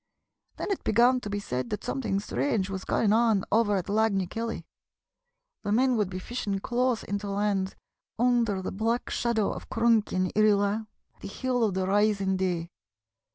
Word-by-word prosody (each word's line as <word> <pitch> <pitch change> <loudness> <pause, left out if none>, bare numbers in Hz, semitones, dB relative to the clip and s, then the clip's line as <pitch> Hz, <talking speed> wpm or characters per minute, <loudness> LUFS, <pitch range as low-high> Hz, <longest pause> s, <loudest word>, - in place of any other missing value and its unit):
Then - - -3
it 390 - -2
began 245 +4 +4
to 210 - -7
be 205 0 -2
said 125 -10 -3
that 210 - -4
something 215 -8 -1
strange 205 -2 -1
was 190 -1 -5
going 210 -2 +2
on 220 -3 +3
over 210 -1 +3
at 185 - -2
Lag 215 0 +2
ny 190 -1 +1
Keilley. 230 +5 -4 1.0
The 205 - -3
men 255 +3 +3
would 210 -4 0
be 185 - -5
fishing 200 0 -3
close 240 +3 0
in 200 0 -3
to 200 0 -6
land 200 -1 -1 0.4
under 230 -5 +2
the - - -3
black 225 +4 -1
shadow 230 -3 0
of - - -8
Cronk 225 -1 +2
yn 185 0 0
Irree 215 0 +5
Laa, 205 +2 0 0.3
the - - -7
Hill 255 -2 -1
of 205 -4 +1
the 190 0 0
Rising 200 -1 +2
Day. 180 -2 -2
210 Hz, 185 wpm, -27 LUFS, 195-230 Hz, 1.0 s, Irree